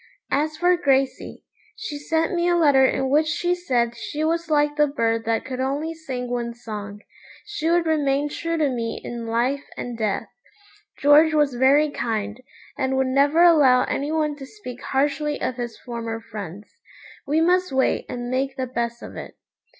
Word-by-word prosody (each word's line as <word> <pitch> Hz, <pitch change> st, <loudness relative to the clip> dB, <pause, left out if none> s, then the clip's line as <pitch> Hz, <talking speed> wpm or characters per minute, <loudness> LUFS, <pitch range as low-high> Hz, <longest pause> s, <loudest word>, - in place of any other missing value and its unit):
As 305 Hz, +2 st, 0 dB
for 355 Hz, +2 st, +4 dB
Gracey, 275 Hz, -5 st, 0 dB, 0.3 s
she 380 Hz, -10 st, -6 dB
sent 320 Hz, +3 st, 0 dB
me 345 Hz, 0 st, +1 dB
a 350 Hz, -, +3 dB
letter 290 Hz, -6 st, +5 dB
in 265 Hz, 0 st, -1 dB
which 305 Hz, +2 st, +3 dB
she 350 Hz, +3 st, 0 dB
said 245 Hz, -10 st, 0 dB
she 295 Hz, +6 st, -4 dB
was 330 Hz, +1 st, -1 dB
like 295 Hz, -1 st, +2 dB
the 295 Hz, 0 st, +3 dB
bird 230 Hz, -5 st, -1 dB
that 225 Hz, 0 st, 0 dB
could 255 Hz, -1 st, -5 dB
only 285 Hz, +5 st, -1 dB
sing 265 Hz, -6 st, -5 dB
one 240 Hz, -1 st, -3 dB
song. 210 Hz, -3 st, -7 dB, 0.4 s
She 410 Hz, -6 st, -2 dB
would 340 Hz, 0 st, +3 dB
remain 290 Hz, -2 st, +1 dB
true 330 Hz, +3 st, -3 dB
to 305 Hz, -2 st, +2 dB
me 235 Hz, -3 st, -3 dB
in 235 Hz, -1 st, -6 dB
life 250 Hz, +5 st, 0 dB
and 245 Hz, -1 st, -5 dB
death. 215 Hz, -3 st, -2 dB, 0.7 s
George 305 Hz, +2 st, +5 dB
was 295 Hz, -3 st, +3 dB
very 280 Hz, +4 st, +4 dB
kind, 220 Hz, -2 st, -3 dB, 0.3 s
and 265 Hz, -1 st, -1 dB
would 265 Hz, -, +2 dB
never 285 Hz, +5 st, +4 dB
allow 290 Hz, -7 st, +6 dB
any 285 Hz, +2 st, -2 dB
one 305 Hz, -2 st, 0 dB
to 270 Hz, -, -8 dB
speak 250 Hz, -, -10 dB
harshly 290 Hz, +2 st, 0 dB
of 255 Hz, -, -2 dB
his 240 Hz, -2 st, -5 dB
former 230 Hz, -2 st, -5 dB
friends. 205 Hz, -3 st, -9 dB, 0.5 s
We 300 Hz, +3 st, +2 dB
must 360 Hz, +1 st, +2 dB
wait 265 Hz, 0 st, +1 dB
and 245 Hz, 0 st, -5 dB
make 265 Hz, +1 st, -1 dB
the 260 Hz, -, -1 dB
best 235 Hz, -1 st, -3 dB
of -, -, -9 dB
it. -, -, -8 dB
275 Hz, 180 wpm, -23 LUFS, 240-310 Hz, 0.7 s, allow